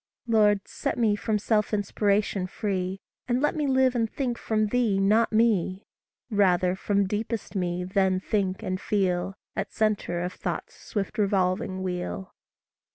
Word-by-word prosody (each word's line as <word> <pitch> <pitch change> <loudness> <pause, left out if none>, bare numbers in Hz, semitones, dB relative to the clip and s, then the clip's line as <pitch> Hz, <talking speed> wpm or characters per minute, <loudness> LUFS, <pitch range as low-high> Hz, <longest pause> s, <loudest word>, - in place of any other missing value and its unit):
Lord, 210 -3 +3
set - - -3
me 220 -3 +3
from 210 +1 0
self 210 0 +1
inspiration 200 -1 0
free, 190 -1 -3 0.3
And 245 0 +1
let 295 +5 +1
me 300 -2 0
live 260 -1 +3
and 230 -3 0
think 255 -4 -2
from 215 -2 0
thee, 230 -4 +2
not 210 +4 +3
me 210 -4 +2 0.5
Rather, 185 -3 +3
from 200 +1 +1
deepest 215 +2 -3
me 180 -1 -1
then 190 0 +1
think 190 -1 -1
and 185 0 -2
feel, 190 -2 0 0.2
At - - -3
centre 210 -5 0
of 180 - -3
thought's - - -4
swift 205 +1 -4
revolving 190 0 +1
wheel. 180 +1 -4
200 Hz, 150 wpm, -26 LUFS, 185-220 Hz, 0.5 s, Lord